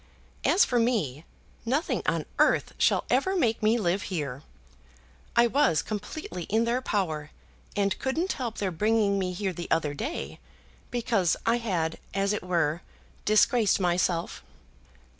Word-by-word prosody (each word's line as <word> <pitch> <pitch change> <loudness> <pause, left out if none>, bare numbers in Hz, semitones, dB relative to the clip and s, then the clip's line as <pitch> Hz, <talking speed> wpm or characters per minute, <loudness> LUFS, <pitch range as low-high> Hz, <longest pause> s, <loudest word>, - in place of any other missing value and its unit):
As 390 - +5
for 245 - +1
me, 180 - 0 0.4
nothing 275 +9 0
on - - 0
earth - - +3
shall - - +3
ever 380 0 +2
make 235 -11 +1
me 220 +2 +3
live 190 -2 0
here. 145 -7 -3 0.9
I 235 - +6
was 235 - +2
completely 205 - -5
in 220 +3 +1
their 240 +2 0
power 160 -10 -2 0.5
and 200 -1 0
couldn't 320 +8 -1
help 240 -4 -4
their 195 -2 -1
bringing 205 +2 +2
me 185 -1 -1
here 190 +1 -2
the 175 0 -6
other 155 -3 +1
day; 280 - -5 0.5
because 225 -7 +1
I 230 +1 +3
had, 175 -9 -2 0.2
as 200 +1 +1
it 210 - -2
were, 170 -3 0 0.4
disgraced 215 0 +4
myself." 175 -2 0
200 Hz, 140 wpm, -27 LUFS, 175-235 Hz, 0.9 s, I